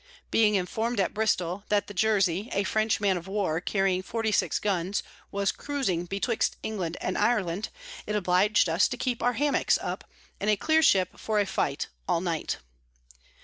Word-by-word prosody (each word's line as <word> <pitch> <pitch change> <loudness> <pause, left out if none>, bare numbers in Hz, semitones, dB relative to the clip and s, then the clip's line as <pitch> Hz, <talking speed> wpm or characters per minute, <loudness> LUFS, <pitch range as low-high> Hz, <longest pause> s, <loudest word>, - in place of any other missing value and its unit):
Being 210 -2 +4
inform'd 220 +5 -1
at 190 - +1
Bristol 195 -3 0
that 205 -1 +2
the 205 - -9
Jersy, 200 0 +1
a 200 - +1
French 215 +2 +1
Man 195 -3 +2
of 175 +1 -8
War 190 -5 -1
carrying 195 -1 +1
46 220 0 0
Guns, 195 -1 -1 0.3
was 200 0 0
cruising 255 -13 -2
betwixt 200 +5 -1
England 185 -6 -3
and 185 - -2
Ireland, 205 -4 +1 0.4
it 210 - -1
oblig'd 195 +1 +3
us 165 +4 +3
to 250 - -5
keep 245 -1 -2
our 245 - +2
Hammocks 290 +2 +2
up, - - -5 0.3
and 210 - 0
a 210 - +5
clear 315 +8 +3
Ship 190 - +4
for 215 -1 0
a 205 - +2
Fight, - - -1 0.2
all - - +2
night. 170 -3 -2
200 Hz, 170 wpm, -27 LUFS, 180-220 Hz, 0.4 s, a